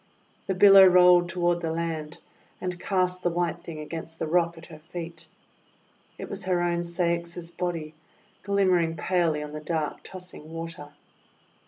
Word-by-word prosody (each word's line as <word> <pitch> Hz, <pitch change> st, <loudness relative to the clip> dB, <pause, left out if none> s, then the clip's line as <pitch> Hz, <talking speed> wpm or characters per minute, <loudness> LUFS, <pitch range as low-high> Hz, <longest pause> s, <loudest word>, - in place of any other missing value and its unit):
The 190 Hz, -, 0 dB
billow 195 Hz, 0 st, +8 dB
rolled 180 Hz, -1 st, +6 dB
toward 175 Hz, 0 st, 0 dB
the 165 Hz, -, -2 dB
land, 160 Hz, -2 st, -4 dB, 0.4 s
and 180 Hz, -1 st, -4 dB
cast 185 Hz, -1 st, 0 dB
the 175 Hz, -, +1 dB
white 170 Hz, -1 st, -2 dB
thing 165 Hz, -3 st, -8 dB
against 160 Hz, +1 st, -7 dB
the -, -, -2 dB
rock 170 Hz, +1 st, +1 dB
at 165 Hz, -, -11 dB
her 155 Hz, -3 st, -12 dB
feet. 165 Hz, 0 st, -9 dB, 0.9 s
It -, -, -7 dB
was -, -, -6 dB
her 180 Hz, -1 st, +1 dB
own 175 Hz, 0 st, 0 dB
Ceyx's 170 Hz, 0 st, -2 dB
body 170 Hz, -3 st, -4 dB, 0.5 s
glimmering 185 Hz, -5 st, +2 dB
palely 165 Hz, -2 st, 0 dB
on 150 Hz, -, -8 dB
the 155 Hz, -, -5 dB
dark 155 Hz, -1 st, -3 dB
tossing 180 Hz, -4 st, -11 dB
water. 165 Hz, -2 st, -6 dB
170 Hz, 155 wpm, -26 LUFS, 165-180 Hz, 0.9 s, billow